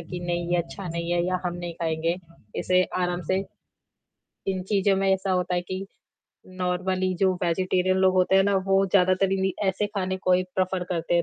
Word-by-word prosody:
कि 175 +1 -7
नहीं 175 0 -1
ये 175 - +3
अच्छा 175 +2 -4
नहीं 170 +1 -3
है 175 0 +2
या 185 0 0
हम 175 - -1
नहीं 175 -1 -5
खाएँगे 165 0 -1 0.4
इसे 185 0 +3 0.2
आराम 180 0 -1
से 190 - +3 1.1
इन 190 -1 0
चीज़ों 195 -1 +3
में 195 - +1
ऐसा 190 0 0
होता 180 0 0
है 175 - +1
कि 185 +2 -5 0.7
नॉर्मली 185 +1 0
जो 190 -1 +4
वेजिटेरियन 185 +2 +1
लोग 190 0 +4
होते 185 +1 +4
हैं 195 - +6
ना, 200 0 +2
वो 195 0 +2
ज़्यादातर 185 0 +3
इन्हीं 190 0 +1 0.2
ऐसे 195 +2 0
खाने 190 -3 -2
को 185 -1 +1
ही 180 0 +4
प्रफर 185 -1 0
करते 170 -1 -1
हैं। 170 - +4
185 Hz, 200 wpm, -25 LUFS, 175-190 Hz, 1.1 s, हैं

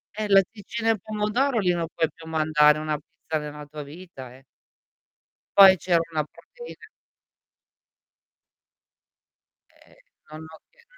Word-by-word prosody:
Eh, 215 0 -3
latticini 205 +3 +1
e 225 -2 +1
pomodoro, 215 +6 -1
lì 190 -4 +2
non 170 -1 -2
puoi 165 -1 0
più 165 -1 -14
mandare 155 -1 +3
una 155 -1 -3
pizza 160 0 -6
nella 150 0 -8
tua 150 +1 -9
vita, 145 -4 -11
eh. 135 - -19 1.1
Poi 190 -1 +9
c'era 175 -1 +1
una 155 -1 -1
proteina 480 - -14 2.8
Ehm, - - -24 0.4
non 155 +1 -9
ho 160 - -13
chie 485 -1 -26
165 Hz, 125 wpm, -24 LUFS, 155-210 Hz, 2.8 s, Poi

